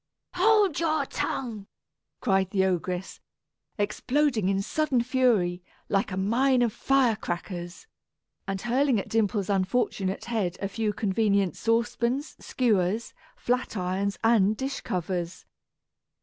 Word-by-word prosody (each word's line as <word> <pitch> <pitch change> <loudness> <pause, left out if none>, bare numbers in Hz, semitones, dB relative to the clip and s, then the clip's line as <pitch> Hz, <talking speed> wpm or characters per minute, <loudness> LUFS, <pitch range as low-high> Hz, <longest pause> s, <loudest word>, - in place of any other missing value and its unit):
"Hold 405 -2 +3
your 315 -2 +1
tongue!" 220 -6 -4 0.5
cried 195 -5 +2
the 190 -1 +2
ogress, 180 0 -2 0.6
exploding 225 +1 +1
in 195 0 0
sudden 275 -2 +1
fury, 230 -9 +2 0.3
like 195 0 +1
a 185 - -3
mine 245 +6 +2
of 230 -3 0
fire 270 -4 +2
crackers, 175 - -6 0.6
and 195 0 -2
hurling 250 0 +2
at - - -6
Dimple's 210 -3 +1
unfortunate 195 0 0
head 210 -7 -1
a 195 - -2
few 215 +1 -1
convenient 200 -3 +1
saucepans, 235 +4 0
skewers, 215 -3 0 0.2
flat 250 -2 -1
irons, 190 +2 -1
and 215 -2 +4
dish 270 +1 -3
covers. 175 -1 -3
215 Hz, 120 wpm, -27 LUFS, 190-250 Hz, 0.6 s, and